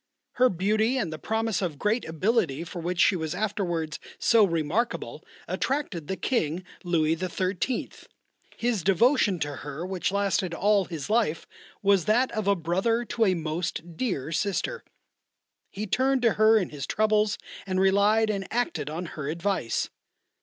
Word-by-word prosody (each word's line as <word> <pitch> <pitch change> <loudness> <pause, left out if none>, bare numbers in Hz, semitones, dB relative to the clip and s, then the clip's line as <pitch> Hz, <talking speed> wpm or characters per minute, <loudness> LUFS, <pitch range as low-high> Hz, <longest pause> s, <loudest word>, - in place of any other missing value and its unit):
Her 255 0 +4
beauty 215 +7 +1
and 190 -11 -1
the 155 - -7
promise 220 0 -1
of 170 -6 -2
great 210 - 0
ability 165 - 0
for 175 +1 -7
which 175 +1 -3
she 200 - +5
was 160 -3 -3
afterwards 175 -8 -2 0.2
so 230 -2 +5
remarkable 170 +6 -1 0.2
attracted 255 - -2
the 190 - -2
King 180 - -1 0.2
Louis 165 -3 +2
XIII. 185 +6 -2 0.7
His 235 -4 0
devotion 200 - +3
to 145 -2 -2
her 145 +4 -6
which 185 0 -2
lasted 195 -3 0
all 205 0 +3
his 160 -6 -6
life 215 -8 +1 0.4
was 195 -4 +4
that 240 +6 +3
of 215 -2 -3
a 200 - +4
brother 190 +8 0
to 230 -1 +1
a 185 -2 +3
most 165 +1 -4
dear 160 - -2
sister. 205 - -1 0.9
He 210 +2 -5
turned 260 +4 +1
to 230 -3 +4
her 215 +1 +5
in 190 -5 0
his 145 -2 -5
troubles 215 -1 +2 0.3
and 185 -1 0
relied 205 +3 +4
and 195 -2 -3
acted 180 - -1
on 165 +4 -4
her 150 -3 -5
advice. 170 - -1
190 Hz, 155 wpm, -27 LUFS, 165-220 Hz, 0.9 s, she